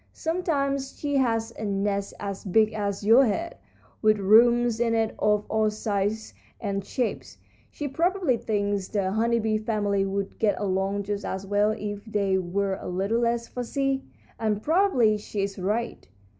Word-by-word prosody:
Sometimes 280 -5 -1
she 285 -1 0
has 225 -3 +1
a - - -4
nest 200 0 -1
as 200 -1 -5
big 215 +3 +3
as 200 -1 -3
your 230 +5 +7
head, 335 +11 -3 0.4
with 215 -1 +4
rooms 235 +3 +4
in 230 -1 +2
it 225 -1 +1
of 210 0 +2
all 220 -1 +2
sizes 210 0 -2 0.3
and 200 -2 -2
shapes. 240 +4 -3 0.3
She 295 - -5
probably 335 0 +1
thinks 205 -3 -1
the 195 -3 -1
honey 230 +3 +2
bee 215 -1 0
family 205 -3 0
would 195 0 -3
get 210 -3 +1
along 195 +1 -1
just 205 0 -3
as 190 +1 -4
well 205 +1 +2
if 205 -1 -5
they 200 -3 +1
were 190 +2 -1
a - - -7
little 195 +6 0
less 235 0 0
fussy, 270 +3 -2 0.4
and 215 -2 -1
probably 295 - +3
she 205 -1 -3
is 195 0 -4
right. 215 +6 -2
215 Hz, 160 wpm, -26 LUFS, 200-235 Hz, 0.4 s, your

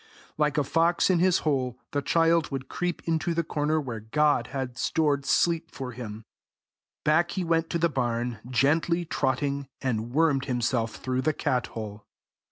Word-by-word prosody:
Like 150 -1 +1
a 145 - +3
fox 165 +6 +2
into 175 -1 +3
his 185 -2 +4
hole, 130 -5 0
the 145 - 0
child 165 +1 +3
would 135 -1 -4
creep 175 +3 -3
into 165 +1 0
the 170 - +1
corner 155 0 0
where 125 -6 -4
God 135 +3 +1
had 130 -2 -4
stored 145 -1 0
sleep 165 +3 +2
for 130 -2 -6
him: 110 -3 -8 0.8
back 160 +3 +3
he 185 - +1
went 165 -1 +1
to 170 - 0
the 170 +1 +3
barn, 120 -5 -2
gently 160 +7 +2
trotting, 140 -1 -1
and 115 -3 -2
wormed 140 -2 +2
himself 120 -3 0
through 130 0 -2
the 155 +4 +1
cat 125 -3 0
hole. 105 -1 -7
140 Hz, 170 wpm, -27 LUFS, 125-165 Hz, 0.8 s, his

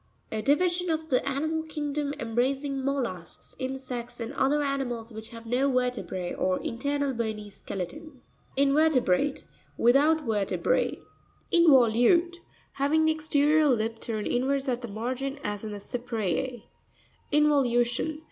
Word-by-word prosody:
A 220 - -2
division 350 +7 +2
of 320 0 -1
the 255 - +2
animal 315 +4 -1
kingdom, 295 -2 -3
embracing 265 +4 -1
mollusks, 240 -11 -3
insects, 255 -2 -5
and 230 +3 -5
other 290 +2 +2
animals 245 -5 -3
which 220 +1 -8
have 230 -1 -11
no 255 +4 +1
ver 250 -1 +2
tebre, 185 -7 -5
or 185 0 +1
internal 280 +3 -1
bony 220 -3 -4
skeleton. 270 - -7 0.4
InvE'RTEBRATE.— 280 - +3 0.3
Without 295 +6 +4
vertebra. 210 -4 +1 0.6
In'voLtutre.—Having 315 +2 +3
the 315 - +4
exterior 305 0 +3
lip 225 -3 0
turned 215 -2 -3
inwards 270 +3 0
at 250 -1 -1
the 240 - -5
margin, 255 +6 -3
as 205 0 -3
in 215 - -5
the 205 - -5
Cypree. 235 0 -3 0.7
Invoxvu'tion. 285 -1 +2
265 Hz, 125 wpm, -27 LUFS, 230-295 Hz, 0.7 s, Without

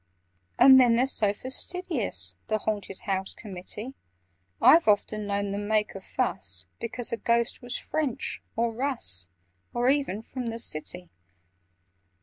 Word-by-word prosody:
"And 265 +1 +9
then 240 -2 +5
they're 250 +2 +3
so 215 -6 +1
fastidious, 250 - -2
The 215 - +1
Haunted 205 -3 -4
House 190 -1 -2
Committee: 210 +5 -7 0.7
I've 330 -4 +7
often 210 0 +2
known 200 0 -1
them 205 +1 -3
make 215 -1 +1
a 195 - -8
fuss - - -2
Because 235 +1 -3
a - - 0
Ghost 235 +1 +1
was 245 0 -3
French, 300 -6 -3
or 230 0 +1
Russ, 230 - 0 0.5
Or 240 +1 +2
even 275 -7 -1
from 250 +1 -5
the 230 0 -3
City! 180 -3 -2
225 Hz, 135 wpm, -27 LUFS, 200-250 Hz, 0.7 s, And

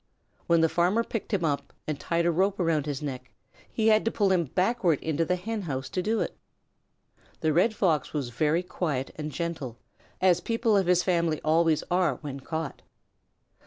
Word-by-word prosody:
When 170 -1 +4
the 165 - +5
farmer 180 +7 +2
picked 225 -2 -5
him 190 -5 +1
up 145 -2 -2
and 155 -2 -3
tied 170 0 0
a 170 - +4
rope 190 +4 +1
around 160 -4 +1
his 145 0 -3
neck, 130 -3 -5 0.4
he 220 -1 +2
had 215 0 +4
to 225 - +1
pull 200 -4 +2
him 175 -3 +2
backward 185 - +1
into 160 +1 0
the 180 - +1
Hen 215 +4 -4
house 135 -7 -4
to 185 - -1
do 220 +4 0
it. - - -3 1.1
The 155 -2 +2
Red 200 +7 +3
Fox 165 -8 +1
was 140 -5 -2
very 155 +8 +1
quiet 150 -7 -2
and 155 0 -5
gentle, 160 -8 -4 0.4
as 180 -2 +4
people 230 -1 +1
of 195 -3 +2
his 180 0 +4
family 170 -4 +1
always 160 0 +3
are 175 -6 +2
when 140 -2 -6
caught. 160 +2 -5
170 Hz, 190 wpm, -27 LUFS, 150-190 Hz, 1.1 s, the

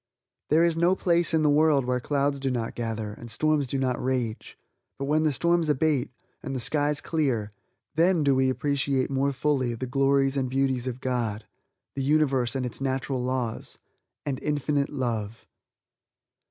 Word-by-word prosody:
There 160 +3 +5
is 170 -1 +1
no 170 +3 +3
place 170 -2 +2
in 160 -2 +2
the 150 - +4
world 150 -3 +4
where 125 0 0
clouds 140 +1 0
do 135 0 -1
not 120 -3 -2
gather, 110 -3 -4
and 115 +2 -10
storms 150 +4 +1
do 135 - -2
not 130 -2 -1
rage; 125 -4 -2 0.4
but 140 - -3
when 150 +2 +2
the 155 - +3
storms 170 +2 +1
abate, 150 -2 +1 0.3
and 135 -3 -5
the - - -2
skies 145 +4 +1
clear, 130 -10 -1 0.4
then 170 +1 +3
do 140 -1 +4
we 130 0 +2
appreciate 140 -1 0
more 135 +1 +1
fully 130 -3 0
the 130 - -4
glories 135 +1 +2
and 130 -2 0
beauties 130 -1 0
of 130 0 -4
God, 115 -4 -2 0.5
the 135 - -3
Universe 135 -3 +2
and 130 -1 -1
its 125 +1 -6
natural 135 -1 -1
laws, 125 -3 -3 0.5
and 135 -3 -3
Infinite 145 -1 0
Love. 115 -6 -3
135 Hz, 170 wpm, -26 LUFS, 125-150 Hz, 0.5 s, There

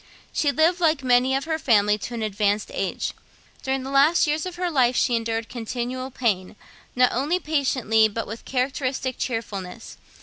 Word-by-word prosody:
She 290 - +2
lived, 325 +5 +2
like 315 -4 +2
many 255 +1 +3
of 275 - -1
her 320 0 -2
family, 210 -6 +3
to 235 - -6
an 225 - -3
advanced 205 0 0
age. - - -2 0.5
During 265 0 -2
the 265 - -6
last 285 +6 +4
years 305 +3 -1
of 365 - -7
her 355 0 -2
life 255 -4 +3
she 240 - +2
endured 225 0 -2
continual 250 +2 -4
pain, 210 -7 -1 0.4
not 250 0 +4
only 285 +8 +1
patiently 260 -8 +2
but 220 +2 -4
with 225 +2 -8
characteristic 260 0 -2
cheerfulness. 225 -4 -5
255 Hz, 170 wpm, -24 LUFS, 225-280 Hz, 0.5 s, last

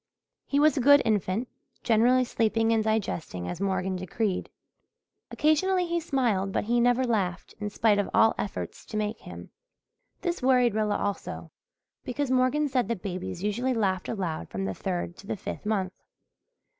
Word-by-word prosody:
He 285 - +1
was 305 +1 +5
a 275 - 0
good 285 +2 +7
infant, 215 +1 0 0.4
generally 240 +3 +4
sleeping 225 -1 +1
and 220 -1 +2
digesting 185 - -2
as 175 - -5
Morgan 190 -1 -1
decreed. 185 +2 -2 0.8
Occasionally 360 +5 +2
he 340 0 -1
smiled 240 - 0
but - - 0
he 235 +3 +1
had 235 - +3
never 245 +1 +3
laughed, 200 -8 -1
in 210 -1 -3
spite 205 0 +2
of 205 - -1
all 225 - +5
efforts 200 - -5
to 215 - -4
make 215 +1 -2
him. - - -10 0.7
This 350 -1 -2
worried 250 -3 +4
Rilla 210 -1 +1
also, 205 -1 -4 0.5
because 260 +1 -2
Morgan 260 +4 +2
said 255 -3 0
that 230 -5 -3
babies 180 -2 -5
usually 240 +5 0
laughed 190 -4 0
aloud 170 - -3
from 95 0 -3
the 95 - -2
third 175 - -4
to 200 - -13
the - - -3
fifth 210 - -6
month. 190 -4 0
220 Hz, 170 wpm, -27 LUFS, 190-255 Hz, 0.8 s, good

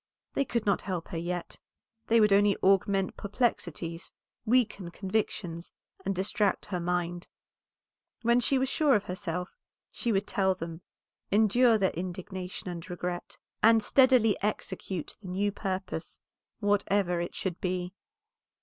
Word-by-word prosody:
They 275 - +1
could 235 -4 -1
not 200 -2 +2
help 180 -4 -4
her 170 - -4
yet; 175 +1 -4 0.5
they 230 0 +5
would 210 -2 +5
only 200 0 +4
augment 195 0 +3
perplexities, 175 -6 -2 0.4
weaken 215 -6 +2
convictions, 185 -3 -3 0.3
and 195 0 -1
distract 200 +2 0
her 180 -3 -3
mind. 175 0 -2 1.0
When 235 +1 +4
she 265 +2 +2
was 260 +1 +1
sure 285 -1 +3
of 205 - +1
herself 180 -1 -4 0.4
she 235 - -1
would 200 -1 +1
tell 190 -2 +1
them, 165 -1 -7 0.5
endure 220 +3 +5
their 190 -3 +2
indignation 185 +1 -6
and 175 -2 -6
regret, 175 0 -4 0.2
and 225 0 +6
steadily 255 -5 +5
execute 190 -4 -3
the 195 - -10
new 200 +3 0
purpose, 190 -4 -4 0.4
whatever 200 -3 +2
it 175 - -5
should 180 -3 -3
be. 180 0 -2
195 Hz, 135 wpm, -29 LUFS, 180-210 Hz, 1.0 s, and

